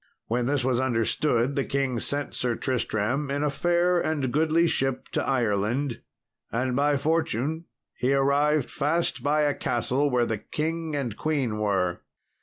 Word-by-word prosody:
When 120 +1 -1
this 140 -2 +1
was 130 -2 +2
understood, 125 +1 +1
the 140 - +1
king 135 -3 -1
sent 145 +3 -2
Sir 120 -2 0
Tristram 130 +3 -1
in 140 +1 -1
a 150 - +1
fair 175 +4 +2
and 145 -7 -1
goodly 160 +3 +3
ship 135 -5 0
to - - -1
Ireland, 120 +1 0 0.5
and 125 +2 -1
by 145 +1 +2
fortune 160 0 -1 0.3
he 125 +2 0
arrived 140 +1 +2
fast 150 -2 0
by 145 +3 +2
a 145 -1 +2
castle 130 +4 0
where 125 -2 +2
the 110 -2 -2
king 160 +4 -3
and 125 -7 -2
queen 135 -8 -1
were. 95 -4 0
135 Hz, 155 wpm, -26 LUFS, 120-150 Hz, 0.5 s, goodly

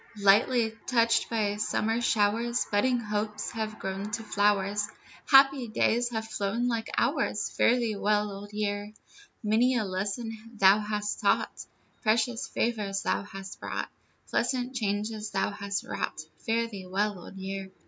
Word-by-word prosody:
Lightly 220 +4 +4 0.2
touched 230 -2 +3
by 210 -3 0
summer 225 +2 0
showers, 230 +2 +2
Budding 245 +5 +2
hopes 210 -1 -3
have 215 -1 -4
grown 195 +2 -4
to 225 -1 -2
flowers, 205 -1 +1 0.4
Happy 270 -3 +6
days 235 +2 +1
have 220 -2 -3
flown 220 +3 -1
like 230 -2 -1
hours, - - +1
Fare 240 - +4
thee 235 -4 -1
well, 210 +1 +1
Old 200 +1 -8
Year. 205 0 -2 0.5
Many 230 +5 +3
a 235 - +1
lesson 200 +4 -3 0.2
thou 195 0 +6
hast 210 0 -2
taught, - - +1 0.4
Precious 230 +1 +1
favors 210 -4 -1
thou - - +1
hast 195 -1 -9
brought, - - -4 0.4
Pleasant 255 0 0
changes 210 -1 -2
thou 195 0 0
hast 200 -1 -3
wrought, - - -4 0.3
Fare 230 +1 +2
thee 195 -5 -8
well, 200 +1 0
Old 175 - -11
Year. 195 0 -5
210 Hz, 145 wpm, -28 LUFS, 200-230 Hz, 0.5 s, Happy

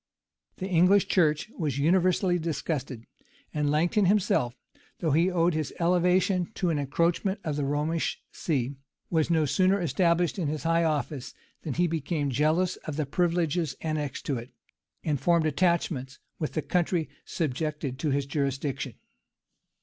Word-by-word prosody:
The 190 - -4
English 185 +2 +4
church 160 +2 +2
was 145 -5 -1
universally 180 +3 +3
disgusted; 145 -7 -3 0.5
and 150 -1 0
Langton 175 +8 +2
himself, 180 -11 +2 0.4
though 160 -3 0
he 165 +6 +3
owed 175 -1 +2
his 155 -2 -2
elevation 180 +1 +2
to 180 -3 0
an 150 - 0
encroachment 170 +7 0
of 155 -2 -2
the 145 -1 -1
Romish 150 +3 -1
see, 135 -4 -2 0.3
was 160 -2 +2
no 160 -2 +3
sooner 185 +8 +3
established 175 0 +1
in 165 - 0
his 150 +1 -3
high 165 0 +2
office, 150 -4 -2 0.3
than 150 - -4
he 175 - +3
became 155 -3 -1
jealous 155 +7 +1
of 155 - -6
the 155 0 -1
privileges 165 -1 0
annexed 155 -4 -3
to 135 -4 -1
it, 120 +2 -10 0.5
and 145 -4 -1
formed 170 -2 +3
attachments 155 -5 0 0.2
with 155 - -3
the 155 - -1
country 175 -2 0 0.2
subjected 150 -3 -3
to 155 - 0
his 140 0 0
jurisdiction. 140 -1 -2
160 Hz, 150 wpm, -27 LUFS, 145-175 Hz, 0.5 s, English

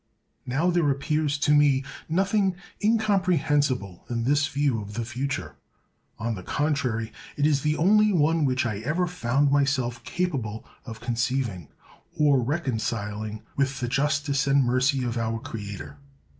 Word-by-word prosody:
Now, 150 +8 +1
there 170 -4 +2
appears 145 +1 0
to 145 - +1
me 145 -2 +4 0.3
nothing 195 +2 +2 0.3
incomprehensible 160 - +1
in 115 -1 -1
this 145 +3 +2
view 140 -6 0
of 105 0 -9
the 115 0 -2
future; 120 - -4 0.6
on 115 +1 -2
the 95 - -6
contrary, 130 - -1 0.2
it 145 - +2
is 145 -2 +3
the 150 +1 0
only 210 +5 +4
one 165 -2 +2
which 130 -3 +1
I 105 -4 -2
ever 155 +11 0
found 140 -5 +1
myself 135 -4 +1
capable 130 -13 -3 0.2
of 115 -2 -8
conceiving 120 - -1 0.5
or 145 -3 +4
reconciling 110 -6 -3
with 135 -1 0
the 120 - -2
justice 140 +1 0
and 140 0 +4
mercy 130 +2 +2
of 120 -1 -2
our 115 0 -1
Creator. 105 +4 -7
135 Hz, 145 wpm, -26 LUFS, 115-150 Hz, 0.6 s, me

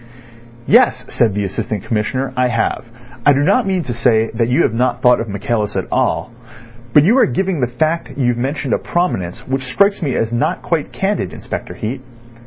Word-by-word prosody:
"Yes," - - +4
said 110 -4 +2
the 105 - 0
Assistant 100 +1 -3
Commissioner; 125 +5 -2
"I 125 0 +2
have. 115 -1 -1 0.4
I 145 - +6
do 140 - +1
not 175 - +2
mean 185 -2 0
to 120 - -4
say 115 -1 +2
that 115 0 0
you 130 +7 +3
have 110 - +1
not 125 +1 0
thought 125 0 +5
of 115 - -4
Michaelis 105 +1 -2
at 95 - -1
all. 125 - 0 0.6
But 145 - +6
you 210 +9 +4
are - - +5
giving 180 +4 -1
the 125 - +2
fact 155 +7 -2
you've 125 -3 +1
mentioned 135 +2 -2
a - - +1
prominence 95 - -2
which 130 0 -1
strikes 200 +6 +2
me 140 -6 -1
as 115 +1 -1
not 120 - -1
quite - - -1
candid, - - -2
Inspector - - -6
Heat. 125 +5 -4
125 Hz, 195 wpm, -17 LUFS, 115-145 Hz, 0.6 s, I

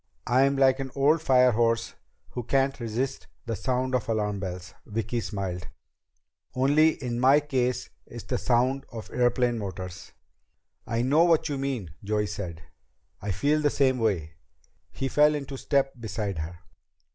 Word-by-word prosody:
"I'm 135 +3 +3
like 135 -1 +4
an 135 -1 -3
old 145 +4 +4
firehorse 120 -4 +3 0.4
who 125 - -4
can't 135 +3 +1
resist 120 +3 -3 0.2
the 115 -2 -2
sound 130 +5 -1
of 125 -3 0
alarm 105 -2 0
bells." 90 -1 -6
Vicki 115 +2 -2
smiled. 95 -3 -4 0.9
"Only 145 +5 +4
in 120 -1 -2
my 135 +3 +6
case 130 -4 -1 0.2
it's - - -9
the - - -2
sound 130 +3 +1
of 115 -3 -8
airplane 120 -1 +1
motors." 95 -2 -7 0.8
"I 115 +1 0
know 145 +6 +4
what 165 -2 +3
you 140 -2 -2
mean," 125 - -3
Joey 105 +1 0
said. 90 -6 -6 0.6
"I 105 - -4
feel 145 - +1
the 150 - +3
same 130 -3 +2
way." 90 -9 0 0.6
He 135 - -3
fell 150 +2 +4
into 140 -1 -5
step 135 0 +1
beside 105 -4 -3
her. 85 +2 -5
120 Hz, 150 wpm, -27 LUFS, 105-135 Hz, 0.9 s, my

